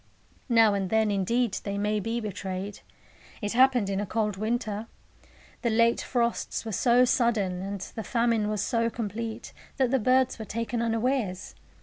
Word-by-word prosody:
Now 225 Hz, -3 st, +5 dB
and 195 Hz, -2 st, -1 dB
then, 220 Hz, 0 st, +2 dB
indeed, 225 Hz, +4 st, 0 dB
they 200 Hz, -1 st, -3 dB
may 210 Hz, +1 st, 0 dB
be 225 Hz, +3 st, -2 dB
betrayed. 195 Hz, -2 st, -5 dB, 0.6 s
It 205 Hz, -1 st, -3 dB
happened 250 Hz, -3 st, +4 dB
in 195 Hz, 0 st, -1 dB
a 205 Hz, -, -1 dB
cold 210 Hz, 0 st, -1 dB
winter. 215 Hz, 0 st, -2 dB, 0.7 s
The 235 Hz, -, +1 dB
late 230 Hz, +1 st, +3 dB
frosts 235 Hz, -2 st, -1 dB
were 220 Hz, -, -4 dB
so 245 Hz, +5 st, +4 dB
sudden, 235 Hz, -8 st, +1 dB
and 195 Hz, 0 st, -5 dB
the 220 Hz, -, -6 dB
famine 230 Hz, -3 st, +1 dB
was 210 Hz, -2 st, -1 dB
so 230 Hz, -2 st, +1 dB
complete, 225 Hz, 0 st, -5 dB, 0.2 s
that 260 Hz, -3 st, +2 dB
the 265 Hz, -, +3 dB
birds 255 Hz, +2 st, +2 dB
were 220 Hz, -, -5 dB
taken 230 Hz, +2 st, -3 dB
unawares. 225 Hz, -4 st, -1 dB
225 Hz, 160 wpm, -27 LUFS, 205-235 Hz, 0.7 s, Now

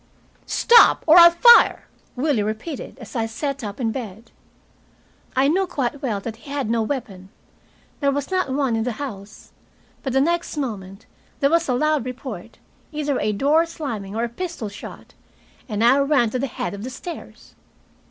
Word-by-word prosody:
"Stop, 470 Hz, 0 st, +5 dB
or 330 Hz, +2 st, +8 dB
I'll 340 Hz, 0 st, +10 dB
fire!" 475 Hz, +8 st, +6 dB, 0.3 s
Willie 265 Hz, -3 st, 0 dB
repeated, 220 Hz, +10 st, -5 dB
as 235 Hz, -4 st, -12 dB
I 225 Hz, -2 st, 0 dB
sat 275 Hz, +4 st, -4 dB
up 205 Hz, +1 st, -6 dB
in 230 Hz, -3 st, 0 dB
bed. 225 Hz, -2 st, -8 dB, 1.0 s
I 265 Hz, +1 st, +3 dB
knew 370 Hz, +5 st, +1 dB
quite 280 Hz, -4 st, -3 dB
well 230 Hz, -8 st, -2 dB
that 225 Hz, +1 st, -6 dB
he 255 Hz, -, -15 dB
had 280 Hz, -5 st, -2 dB
no 230 Hz, -1 st, +1 dB
weapon. 215 Hz, -7 st, -5 dB, 0.7 s
There 280 Hz, -, +1 dB
was 285 Hz, +4 st, -3 dB
not 370 Hz, -6 st, 0 dB
one 265 Hz, -3 st, 0 dB
in 225 Hz, -, 0 dB
the 245 Hz, 0 st, -2 dB
house. 210 Hz, -6 st, -9 dB, 0.5 s
But 265 Hz, -, -3 dB
the 265 Hz, -, +3 dB
next 340 Hz, +1 st, -1 dB
moment 205 Hz, -7 st, -5 dB, 0.3 s
there 280 Hz, +1 st, +2 dB
was 335 Hz, -3 st, +2 dB
a 250 Hz, -, +2 dB
loud 305 Hz, 0 st, +1 dB
report, 255 Hz, +1 st, -8 dB, 0.3 s
either 295 Hz, -3 st, -2 dB
a 210 Hz, -, 0 dB
door 295 Hz, +10 st, +2 dB
slamming 225 Hz, -12 st, -6 dB
or 230 Hz, -, -1 dB
a 240 Hz, -, -2 dB
pistol 330 Hz, -, -5 dB
shot, 205 Hz, -, -11 dB, 0.6 s
and 215 Hz, 0 st, -1 dB
I 255 Hz, +4 st, +5 dB
ran 275 Hz, -5 st, +2 dB
to 255 Hz, -, -2 dB
the 275 Hz, -, -1 dB
head 175 Hz, -7 st, -5 dB
of 200 Hz, +1 st, -7 dB
the 255 Hz, -, -5 dB
stairs. 340 Hz, +7 st, -10 dB
260 Hz, 180 wpm, -22 LUFS, 220-295 Hz, 1.0 s, I'll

